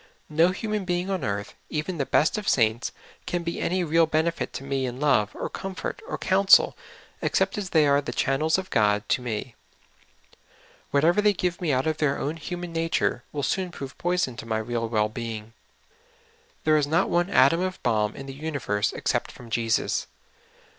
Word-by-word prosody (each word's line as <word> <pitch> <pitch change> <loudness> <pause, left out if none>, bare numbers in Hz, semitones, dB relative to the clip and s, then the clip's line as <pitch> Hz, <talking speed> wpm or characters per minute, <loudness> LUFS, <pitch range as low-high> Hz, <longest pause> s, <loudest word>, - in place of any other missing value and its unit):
No 160 +3 +4
human 210 +2 -2
being 180 +1 -1
on 190 - -2
earth, 100 -1 -3 0.2
even 155 +2 -3
the 140 - 0
best 155 - +3
of 210 -2 -1
saints, 115 -1 +2 0.4
can 175 -1 -1
be 170 0 -3
any 185 +1 0
real 165 0 +3
benefit 160 +2 0
to - - -6
me 135 -1 -1
in 125 +1 -6
love 140 -8 +3
or - - -3
comfort 190 -1 -5
or - - -3
counsel, 195 +1 +5 0.5
except 190 0 +1
as 200 -3 -4
the}^ 155 -4 +4
are 140 0 +4
the - - -5
channels 155 +5 +1
of 190 0 -5
God 105 -1 +2
to - - +2
me; 120 0 -4 1.4
whatever 165 +8 +3
they 210 0 +4
give 180 -1 -2
me 165 -4 +1
out 130 0 +1
of 155 -1 0
their 145 -3 +1
own 150 +4 -3
human 175 +1 -6
nature 165 -6 0
will 145 -1 -3
soon 185 +7 0
prove 140 -5 -8
poison 175 -8 0
to - - -7
my 110 -1 0
real 115 +1 -2
well 105 -2 +2
being. 110 -1 -6 1.1
There 155 0 +4
is 145 -2 +1
not 160 +3 +2
one 175 +2 +1
atom 165 +3 +5
of 185 0 -2
balm 105 -3 +1
in 135 - -8
the 135 - -7
universe 135 -9 -2
except - - -1
from 120 -2 -13
Jesus. 115 0 0
150 Hz, 190 wpm, -26 LUFS, 120-175 Hz, 1.4 s, counsel